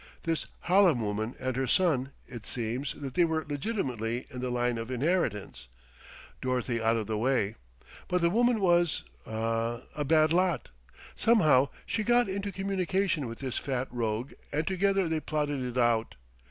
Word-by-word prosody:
This 165 Hz, -1 st, -1 dB
Hallam 180 Hz, -6 st, +4 dB
woman 110 Hz, +2 st, -2 dB
and 130 Hz, -1 st, -2 dB
her 130 Hz, 0 st, 0 dB
son 140 Hz, -4 st, +2 dB
it 120 Hz, -4 st, -9 dB
seems 120 Hz, +4 st, -3 dB
that 135 Hz, -3 st, -6 dB
they 175 Hz, -, +4 dB
were 160 Hz, -1 st, 0 dB
legitimately 130 Hz, -, -2 dB
in 125 Hz, -, -6 dB
the 125 Hz, -, -2 dB
line 120 Hz, -1 st, 0 dB
of 115 Hz, +1 st, -5 dB
inheritance, 125 Hz, -, -1 dB, 0.7 s
Dorothy 125 Hz, -2 st, -1 dB
out 115 Hz, +1 st, +3 dB
of 110 Hz, -, -2 dB
the 110 Hz, 0 st, -2 dB
way. 115 Hz, -4 st, +1 dB, 0.5 s
But 180 Hz, 0 st, +1 dB
the 170 Hz, 0 st, +3 dB
woman 240 Hz, +1 st, +3 dB
was 175 Hz, -3 st, +3 dB, 0.2 s
ah 115 Hz, +1 st, -1 dB
a 150 Hz, -, -1 dB
bad 155 Hz, +2 st, +4 dB
lot. 175 Hz, -, +1 dB, 0.5 s
Somehow 155 Hz, -, +4 dB, 0.2 s
she 215 Hz, -, -1 dB
got 240 Hz, +1 st, +4 dB
into 200 Hz, +1 st, -3 dB
communication 190 Hz, -5 st, 0 dB
with 115 Hz, 0 st, -7 dB
this 130 Hz, -3 st, -2 dB
fat 130 Hz, -1 st, -2 dB
rogue 115 Hz, +1 st, -2 dB, 0.2 s
and 150 Hz, +2 st, 0 dB
together 195 Hz, 0 st, +2 dB
they 160 Hz, -1 st, 0 dB
plotted 145 Hz, -3 st, -1 dB
it 125 Hz, 0 st, -4 dB
out. 120 Hz, -2 st, +2 dB
135 Hz, 165 wpm, -29 LUFS, 120-175 Hz, 0.7 s, Hallam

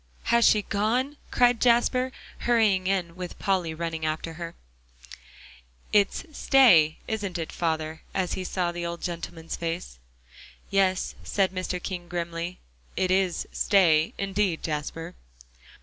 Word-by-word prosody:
"Has 235 Hz, 0 st, +5 dB
she 210 Hz, -1 st, +5 dB
gone?" 245 Hz, +9 st, 0 dB
cried 245 Hz, -1 st, +3 dB
Jasper, 250 Hz, +2 st, +3 dB, 0.3 s
hurrying 215 Hz, -6 st, +2 dB
in 180 Hz, -3 st, -1 dB
with 180 Hz, -1 st, -7 dB
Polly 185 Hz, -4 st, 0 dB
running 165 Hz, -1 st, -4 dB
after. 165 Hz, +2 st, -4 dB, 1.4 s
"It's 205 Hz, +6 st, +2 dB
'stay,' 175 Hz, -, +5 dB
isn't 205 Hz, -5 st, -3 dB
it, 165 Hz, -2 st, -4 dB
father?" 160 Hz, -1 st, -2 dB
as 185 Hz, -2 st, -1 dB
he 185 Hz, -, -3 dB
saw 180 Hz, -1 st, -1 dB
the 175 Hz, 0 st, -5 dB
old 170 Hz, 0 st, -5 dB
gentleman's 170 Hz, -1 st, -5 dB
face. 165 Hz, -, -4 dB, 0.7 s
"Yes," 190 Hz, -1 st, +2 dB
said 195 Hz, -2 st, +1 dB
Mr. 185 Hz, -1 st, -3 dB
King 175 Hz, -1 st, -5 dB
grimly, 170 Hz, 0 st, -4 dB, 0.4 s
"it 185 Hz, -1 st, +1 dB
is 185 Hz, -2 st, +1 dB
'stay' 165 Hz, -6 st, +3 dB
indeed, 195 Hz, -3 st, -1 dB
Jasper." 165 Hz, +2 st, -4 dB
180 Hz, 125 wpm, -26 LUFS, 165-200 Hz, 1.4 s, Has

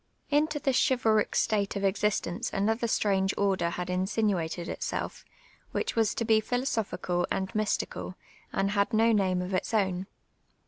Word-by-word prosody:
Into 300 Hz, +1 st, +2 dB
this 270 Hz, -3 st, +1 dB
chivalric 225 Hz, -5 st, +2 dB
state 205 Hz, -3 st, +1 dB
of 200 Hz, -, -2 dB
existence 195 Hz, -2 st, 0 dB
another 225 Hz, +4 st, 0 dB
strange 195 Hz, -3 st, +1 dB
order 195 Hz, -4 st, +1 dB
hiul 180 Hz, +1 st, -4 dB
insinuated 180 Hz, -3 st, -1 dB
itself, -, -, -4 dB, 0.5 s
which -, -, -1 dB
was 225 Hz, -2 st, +2 dB
to 230 Hz, -, -1 dB
be 220 Hz, -1 st, +5 dB
philosophical 220 Hz, -7 st, -1 dB
and 190 Hz, +3 st, -2 dB
mys 215 Hz, -1 st, +1 dB
tical, -, -, -6 dB, 0.4 s
and 195 Hz, +1 st, 0 dB
had 200 Hz, 0 st, +1 dB
no 225 Hz, +1 st, +4 dB
name 185 Hz, -4 st, +2 dB
of 185 Hz, +2 st, -5 dB
its 185 Hz, +4 st, -1 dB
o>\'n. 190 Hz, -2 st, 0 dB
200 Hz, 150 wpm, -29 LUFS, 190-225 Hz, 0.5 s, be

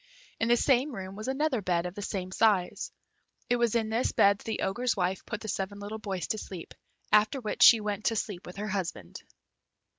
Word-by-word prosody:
In 225 Hz, -, +1 dB
the 240 Hz, 0 st, +4 dB
same 265 Hz, +2 st, +2 dB
room 190 Hz, -1 st, -7 dB
was 215 Hz, +3 st, -6 dB
another 270 Hz, -2 st, 0 dB
bed 175 Hz, -2 st, 0 dB
of 180 Hz, -, -4 dB
the 205 Hz, -, -7 dB
same 185 Hz, -2 st, -4 dB
size. 195 Hz, -3 st, +1 dB, 0.6 s
It 245 Hz, -, +4 dB
was 235 Hz, -1 st, +1 dB
in 225 Hz, -2 st, +1 dB
this 230 Hz, +3 st, +1 dB
bed 200 Hz, 0 st, +4 dB
that -, -, -16 dB
the 220 Hz, -, -3 dB
Ogre's 235 Hz, +4 st, 0 dB
wife 185 Hz, 0 st, -1 dB
put 210 Hz, -1 st, -4 dB
the 220 Hz, -, -7 dB
seven 200 Hz, 0 st, -3 dB
little 210 Hz, +2 st, -6 dB
boys 190 Hz, -5 st, -3 dB
to 215 Hz, -, -1 dB
sleep, 180 Hz, -5 st, -8 dB, 0.4 s
after 210 Hz, +5 st, +4 dB
which 230 Hz, 0 st, -4 dB
she 240 Hz, -2 st, +9 dB
went 210 Hz, 0 st, -3 dB
to 225 Hz, -, +2 dB
sleep 200 Hz, -4 st, -4 dB
with 180 Hz, -, -9 dB
her 210 Hz, +2 st, -4 dB
husband. 170 Hz, -, -4 dB
210 Hz, 215 wpm, -29 LUFS, 190-230 Hz, 0.6 s, she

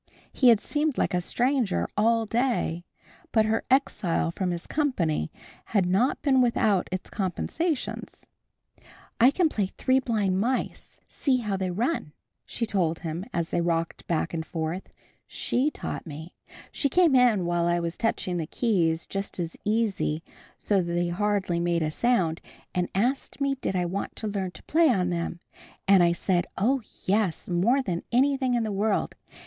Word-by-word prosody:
He 255 Hz, -, +5 dB
had 230 Hz, -3 st, +6 dB
seemed 295 Hz, +1 st, -1 dB
like -, -, +1 dB
a 180 Hz, -, +1 dB
stranger 245 Hz, +1 st, 0 dB
all 225 Hz, +2 st, +3 dB
day. 225 Hz, -7 st, 0 dB, 0.5 s
But 220 Hz, -1 st, +4 dB
her 220 Hz, +1 st, 0 dB
exile 210 Hz, -11 st, +1 dB
from 185 Hz, +1 st, -2 dB
his 175 Hz, -1 st, -3 dB
company 180 Hz, -, 0 dB, 0.3 s
had 200 Hz, -4 st, +1 dB
not 195 Hz, +9 st, +1 dB
been 265 Hz, -3 st, +4 dB
without 215 Hz, -6 st, +2 dB
its 185 Hz, 0 st, -4 dB
compensations. 250 Hz, -, -3 dB, 0.9 s
"I 240 Hz, +3 st, +7 dB
can 340 Hz, +4 st, +2 dB
play 210 Hz, -10 st, -1 dB
'Three 260 Hz, +7 st, +1 dB
Blind 210 Hz, -7 st, 0 dB
Mice! 250 Hz, +5 st, -2 dB
See 265 Hz, -3 st, +1 dB
how 210 Hz, -3 st, -2 dB
they 190 Hz, -1 st, -2 dB
run!'" 210 Hz, -, -1 dB, 0.3 s
she 230 Hz, -, -2 dB
told 175 Hz, -7 st, 0 dB
him 165 Hz, +2 st, -4 dB
as 170 Hz, -1 st, -2 dB
they -, -, 0 dB
rocked 165 Hz, -1 st, -2 dB
back 165 Hz, 0 st, -1 dB
and 160 Hz, -1 st, -2 dB
forth. 165 Hz, +3 st, -4 dB, 0.4 s
"She 265 Hz, +5 st, 0 dB
taught 295 Hz, -, -6 dB
me. 160 Hz, +3 st, -8 dB, 0.4 s
She 280 Hz, -, 0 dB
came 345 Hz, 0 st, +4 dB
in 235 Hz, -8 st, +4 dB
while 170 Hz, 0 st, +1 dB
I 175 Hz, 0 st, +2 dB
was 170 Hz, 0 st, -3 dB
touching 185 Hz, -5 st, -1 dB
the 160 Hz, -2 st, -3 dB
keys 170 Hz, -9 st, +1 dB
just 195 Hz, -1 st, -5 dB
as 170 Hz, -1 st, -3 dB
easy, 205 Hz, -7 st, 0 dB, 0.3 s
so 200 Hz, -2 st, +1 dB
they 175 Hz, 0 st, -1 dB
hardly 195 Hz, -1 st, 0 dB
made 170 Hz, -1 st, +1 dB
a 155 Hz, -, -1 dB
sound, 180 Hz, -6 st, +1 dB, 0.3 s
and 180 Hz, -1 st, 0 dB
asked 250 Hz, +9 st, 0 dB
me 275 Hz, -1 st, +1 dB
did 260 Hz, -8 st, -3 dB
I 180 Hz, -1 st, +1 dB
want 185 Hz, +3 st, -4 dB
to 220 Hz, -, -4 dB
learn 200 Hz, -3 st, -2 dB
to -, -, -13 dB
play 325 Hz, 0 st, +3 dB
on 180 Hz, -7 st, +1 dB
them. 170 Hz, 0 st, -3 dB, 0.5 s
And 195 Hz, -2 st, +7 dB
I 170 Hz, -1 st, +5 dB
said 175 Hz, 0 st, 0 dB
oh, 255 Hz, +7 st, +2 dB, 0.2 s
yes, 195 Hz, -3 st, +1 dB
more 220 Hz, +10 st, +2 dB
than 175 Hz, -7 st, -2 dB
anything 260 Hz, 0 st, +2 dB
in 235 Hz, -, +1 dB
the 215 Hz, -, -2 dB
world. 205 Hz, +1 st, 0 dB
195 Hz, 170 wpm, -26 LUFS, 175-245 Hz, 0.9 s, I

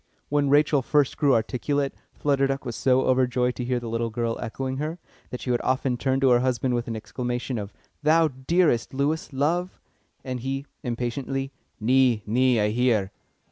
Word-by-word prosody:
When 145 Hz, -1 st, +2 dB
Rachel 145 Hz, 0 st, +4 dB
first 145 Hz, +1 st, +2 dB
grew 140 Hz, -4 st, +3 dB
articulate, 135 Hz, +5 st, -1 dB, 0.2 s
Flutter 140 Hz, -1 st, +1 dB
Duck 135 Hz, 0 st, -3 dB
was 120 Hz, -2 st, -4 dB
so 130 Hz, 0 st, +3 dB
overjoyed 125 Hz, -1 st, +2 dB
to 125 Hz, -, -3 dB
hear 125 Hz, 0 st, 0 dB
the 120 Hz, -, -7 dB
little 115 Hz, 0 st, -1 dB
girl 115 Hz, 0 st, -2 dB
echoing 130 Hz, +3 st, -4 dB
her, 155 Hz, +4 st, -3 dB, 0.3 s
that 125 Hz, -, -6 dB
she 125 Hz, -, -2 dB
would 120 Hz, -, +1 dB
often 130 Hz, -1 st, 0 dB
turn 130 Hz, +3 st, 0 dB
to 135 Hz, -2 st, +5 dB
her 120 Hz, -, +5 dB
husband 125 Hz, 0 st, 0 dB
with 120 Hz, -1 st, -1 dB
an 115 Hz, -, -3 dB
exclamation 120 Hz, +2 st, -3 dB
of 100 Hz, 0 st, -6 dB, 0.3 s
"Thou 160 Hz, +1 st, +4 dB, 0.2 s
hearest, 165 Hz, -9 st, +2 dB
Lewis, 150 Hz, +4 st, -1 dB
love?" 165 Hz, +7 st, -1 dB, 0.4 s
And 130 Hz, -1 st, -4 dB
he, 135 Hz, +3 st, -3 dB, 0.2 s
impatiently: 135 Hz, +2 st, -3 dB, 0.3 s
"Nee, 125 Hz, -1 st, +3 dB
nee, 125 Hz, +2 st, +3 dB
I 105 Hz, 0 st, +2 dB
hear." 110 Hz, -4 st, +1 dB
130 Hz, 180 wpm, -25 LUFS, 120-140 Hz, 0.4 s, to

